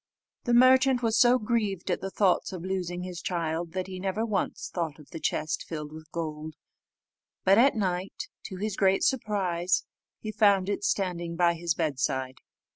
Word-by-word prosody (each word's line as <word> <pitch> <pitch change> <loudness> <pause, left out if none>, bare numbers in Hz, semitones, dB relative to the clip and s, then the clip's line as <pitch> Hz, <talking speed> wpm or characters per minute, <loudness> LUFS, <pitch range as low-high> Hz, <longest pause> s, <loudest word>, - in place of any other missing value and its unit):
The 240 -2 +3
merchant 255 0 +5
was 225 -1 +2
so 245 +1 +6
grieved 210 -6 -1
at - - -1
the 195 - -3
thoughts 190 -1 +2
of 180 -3 -6
losing 180 -2 -3
his 180 -2 -6
child, 165 -1 -2
that 185 -1 -2
he 185 -1 -7
never 195 +4 -1
once 210 -4 -2
thought 165 -4 -2
of 150 -3 -16
the 165 - -6
chest 155 0 -1
filled 150 -2 -5
with 155 0 -12
gold, 155 -2 -5 0.9
but 195 +3 +5
at 270 +2 +5
night, 185 -3 -2 0.2
to 190 - -6
his 205 +1 -3
great 195 -1 +3
surprise, 195 -8 +1 0.4
he 215 - -5
found 200 -3 +3
it 205 - -2
standing 180 - -1
by 170 0 +3
his 170 -1 -1
bedside. 130 -4 -1
185 Hz, 175 wpm, -28 LUFS, 170-210 Hz, 0.9 s, so